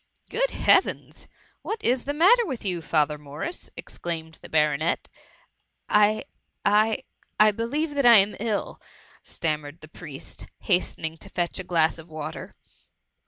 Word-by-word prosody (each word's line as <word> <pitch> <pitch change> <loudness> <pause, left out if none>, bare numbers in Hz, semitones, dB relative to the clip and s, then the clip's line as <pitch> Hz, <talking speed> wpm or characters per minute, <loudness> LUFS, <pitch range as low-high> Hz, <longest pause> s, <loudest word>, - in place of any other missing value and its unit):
Good - - +1
Heavens! - - +1 0.3
what 435 0 -4
i& 240 - +5
the 265 +2 -3
matter 380 +12 +5
with 260 -8 -5
you, 180 -3 0
Father 150 -2 +1
Morris?'^ 150 - -6
exclaimed 160 -2 -6
the - - -11
Baronet. 150 +1 +1 0.5
" - - -48 0.2
I 210 +1 +4 0.2
— - - -52
I 215 +2 +3 0.2
— - - -38
I 215 0 +7
believe 285 +9 -2
that 280 -2 0
I 235 -2 +10
am 200 +1 +3
iU,'' 215 -1 -2 0.4
stammered 150 -1 -4
the 155 - -12
priest, 150 -3 -8
hastening 165 -4 -1
to 195 - -11
fetch 175 -2 -1
a - - -4
glass 165 -3 +1
of 165 +1 -13
water. 155 0 -7
180 Hz, 155 wpm, -25 LUFS, 155-230 Hz, 0.5 s, I